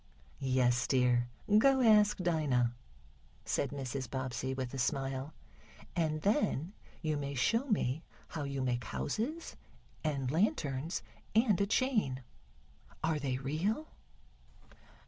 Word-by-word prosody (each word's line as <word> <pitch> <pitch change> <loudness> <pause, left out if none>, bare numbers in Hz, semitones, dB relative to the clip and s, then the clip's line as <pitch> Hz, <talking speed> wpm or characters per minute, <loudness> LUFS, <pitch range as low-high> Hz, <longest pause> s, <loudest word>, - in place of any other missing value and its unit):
"Yes, 130 -2 +2
dear, 125 -2 +3 0.3
go 270 +3 +5
ask 210 -3 +6
Dinah," 150 -9 +1 0.7
said 140 - 0
Mrs. 135 -3 -4
Bobbsey, 130 -1 -3
with 130 -1 -3
a 135 - -3
smile. 135 +3 -1 0.6
"And 155 -2 0
then 200 - +1 0.3
you 155 -1 0
may 140 -1 -3
show 225 - +2
me 160 - +1 0.3
how 155 - -4
you 140 -2 -2
make 120 -2 -1
houses 225 - -3 0.5
and 140 -5 -1
lanterns 155 -3 0 0.3
and 220 -4 +4
a 200 - +2
chain. 210 - +1 0.8
Are 160 -2 +1
they 135 -3 -1
real?" 165 - -1
140 Hz, 115 wpm, -33 LUFS, 130-195 Hz, 0.8 s, ask